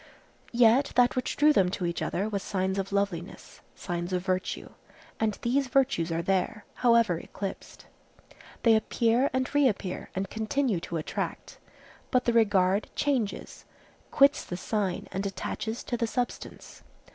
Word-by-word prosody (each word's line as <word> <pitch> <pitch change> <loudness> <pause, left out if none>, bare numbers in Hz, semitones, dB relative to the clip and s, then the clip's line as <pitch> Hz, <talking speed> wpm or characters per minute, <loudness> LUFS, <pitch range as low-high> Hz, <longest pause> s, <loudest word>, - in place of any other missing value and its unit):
Yet 240 +3 +4
that 245 0 +4
which 255 - -2
drew 300 +1 +5
them 190 -8 +3
to 180 0 -3
each 170 0 -2
other 195 +4 -1
was 200 -2 -2
signs 190 0 -1
of 195 0 -3
loveliness, 200 -3 -3
signs 175 0 -4
of 180 0 -1
virtue; 185 -1 -2 0.5
and 215 -2 0
these 265 +3 +1
virtues 250 -11 +1
are 165 +1 -1
there, 195 +3 -1 0.2
however 230 -8 +4
eclipsed. 195 +2 -7 0.8
They 230 -2 +6
appear 230 +4 +2
and 260 0 -1
reappear 235 -10 0
and 190 +1 -2
continue 220 0 -1
to 170 0 -4
attract; 155 - -5 0.5
but 255 -1 +2
the 240 - +2
regard 200 -3 +3
changes, 255 -8 -2 0.4
quits 280 +1 +4
the 175 - -6
sign 195 -1 -2
and 195 - -2
attaches 220 +4 -4
to 240 - -3
the 230 - 0
substance. 245 +1 -5
215 Hz, 145 wpm, -28 LUFS, 185-245 Hz, 0.8 s, They